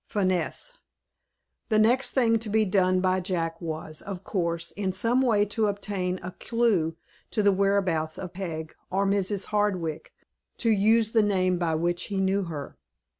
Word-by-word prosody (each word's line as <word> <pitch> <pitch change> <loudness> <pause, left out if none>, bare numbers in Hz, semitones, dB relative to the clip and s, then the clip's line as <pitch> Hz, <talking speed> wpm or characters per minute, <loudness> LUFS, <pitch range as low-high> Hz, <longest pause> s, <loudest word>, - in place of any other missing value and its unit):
FINESSE. 195 - -1 0.9
THE 215 - +3
next 240 +5 +3
thing 230 -4 +3
to 220 -1 -5
be 215 +1 +3
done 185 -1 +2
by 185 0 +2
Jack 170 -3 -2
was, 155 -1 -5
of 195 -2 -7
course, 170 -4 -2
in 195 -2 -2
some 230 +7 +2
way 215 -5 +3
to 215 +1 0
obtain 200 -3 -2
a 180 - -5
clew 205 -9 0 0.3
to 215 - 0
the 200 - +5
whereabouts 185 -5 +1
of 180 -2 -7
Peg, 165 -4 -5 0.2
or 195 +2 +1
Mrs. 200 0 0
Hardwick, 185 -7 -1 0.5
to 230 - +2
use 220 +2 +3
the 225 - +4
name 185 -3 +1
by 165 -2 0
which 175 +2 0
he 200 -1 -3
knew 190 0 +1
her. 150 -4 -7
190 Hz, 165 wpm, -26 LUFS, 175-210 Hz, 0.9 s, the